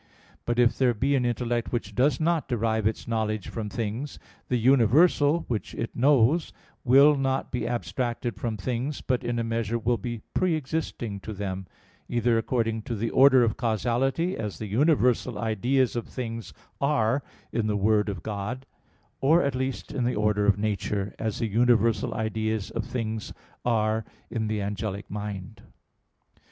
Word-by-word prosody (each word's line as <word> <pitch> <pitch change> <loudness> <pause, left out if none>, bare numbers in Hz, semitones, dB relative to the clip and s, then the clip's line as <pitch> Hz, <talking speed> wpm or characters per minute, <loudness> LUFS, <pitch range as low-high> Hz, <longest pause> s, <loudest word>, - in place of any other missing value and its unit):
But 120 0 0
if 120 0 +4
there 125 -3 +3
be 135 +6 +1
an 130 -3 +2
intellect 120 0 -1
which 110 -4 -3
does 130 +7 +2
not 165 0 +1
derive 110 -3 +1
its 110 - -3
knowledge 110 -3 -1
from 110 -2 -4
things, 115 +6 -4 0.3
the 125 - +1
universal 145 - +4
which 115 -4 -3
it 115 - -4
knows 140 +4 +3 0.3
will 140 +4 +6
not 135 -1 -1
be 120 -2 -2
abstracted 120 0 -2
from 115 -3 -3
things, 125 +8 -3
but 125 -1 -1
in 120 0 -1
a 115 - 0
measure 115 0 -1
will 115 0 0
be 120 +1 -5
pre 180 -3 +2
existing 130 -8 -3
to 110 +3 -7
them; 95 -2 -4 0.4
either 120 0 +2
according 115 -1 -1
to 115 +2 -4
the 115 +2 -2
order 130 -2 +6
of 115 - 0
causality, 125 - 0
as 105 -3 -4
the 110 - -5
universal 125 0 +2
ideas 120 +4 +1
of 120 - -3
things 115 -3 -5 0.3
are 140 -2 +2 0.3
in 115 -2 0
the 105 -1 +1
Word 105 +1 +2
of 95 -4 -5
God; 110 +5 -4 0.5
or 160 +6 +4
at 140 -2 0
least 130 +1 -3
in 125 - -1
the 125 +1 0
order 105 -1 +1
of 100 -1 +4
nature, 100 -1 -2
as 110 -2 -2
the 115 - -1
universal 115 0 +2
ideas 110 -1 -2
of 115 -1 -3
things 115 -3 -4 0.3
are 110 -2 +1 0.3
in 110 -2 -1
the 105 -1 -1
angelic 100 0 -4
mind. 100 -3 -6
115 Hz, 165 wpm, -26 LUFS, 110-130 Hz, 0.5 s, will